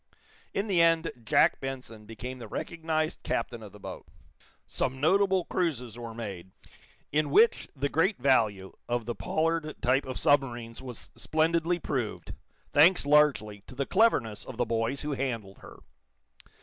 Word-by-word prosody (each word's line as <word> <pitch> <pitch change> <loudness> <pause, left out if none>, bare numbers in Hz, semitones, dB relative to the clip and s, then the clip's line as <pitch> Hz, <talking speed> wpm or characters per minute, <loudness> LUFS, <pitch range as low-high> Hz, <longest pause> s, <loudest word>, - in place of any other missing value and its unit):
In 200 - -1
the 190 -5 +3
end 165 0 +3
Jack 110 - +3
Benson 125 -5 -7
became 125 +4 -7
the 115 - -8
recognized 160 +4 -2
captain 115 0 -3
of 105 -2 -10
the 105 - -14
boat. - - -9 0.6
Some 130 0 -2
notable 190 +3 +3
cruises 130 - -2
were 115 -2 -8
made, 95 -6 -6 0.6
in 150 0 +1
which 225 +11 +4
the 140 +1 -1
great 170 +8 +1
value 110 -8 +1 0.2
of 120 -1 -1
the 120 - -2
Pollard 160 +3 -1
type 130 +3 +1
of 130 - -4
submarines 120 -5 +1
was 125 -3 -9
splendidly 165 +2 +1
proved, 115 - -4 0.4
thanks 165 +2 +6
largely 140 -9 +3
to 130 - -11
the 140 +1 -1
cleverness 125 - +2
of 130 - -9
the 120 - +1
boys 115 +5 -1
who 150 - -3
handled 115 -8 -3
her. - - -13
130 Hz, 150 wpm, -28 LUFS, 115-160 Hz, 0.6 s, thanks